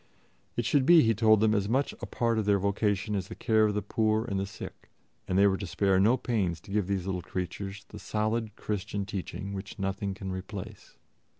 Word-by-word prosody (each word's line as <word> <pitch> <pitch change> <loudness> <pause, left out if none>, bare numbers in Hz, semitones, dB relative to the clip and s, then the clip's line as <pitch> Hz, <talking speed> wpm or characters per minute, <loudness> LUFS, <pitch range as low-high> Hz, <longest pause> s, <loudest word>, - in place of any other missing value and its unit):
It - - -1
should 135 -3 +2
be, 170 -2 +8
he 115 - +3
told 110 -1 +4
them, 110 -1 +4
as 100 -1 0
much 135 +4 +1
a - - -4
part 115 -2 0
of 110 - -1
their 100 -1 +4
vocation 100 +1 0
as 95 -2 -2
the 110 - -8
care 110 -1 +3
of 105 -1 0
the 105 - -1
poor 110 0 +1
and 100 -5 -2
the 100 - -2
sick, 100 - -10 0.4
and 90 - 0
they 100 - +6
were 95 -1 +3
to 100 - -5
spare 95 +1 +2
no 110 +6 +4
pains 100 -11 -1
to 100 - -13
give 105 -2 0
these 95 -3 -1
little 95 -2 -2
creatures 95 +3 -5
the 105 - -9
solid 110 +2 -1
Christian 100 -1 -3
teaching 100 0 -5
which 100 +1 -7
nothing 100 0 -2
can 95 -1 -5
replace. 100 +2 -7
100 Hz, 220 wpm, -29 LUFS, 95-110 Hz, 0.4 s, be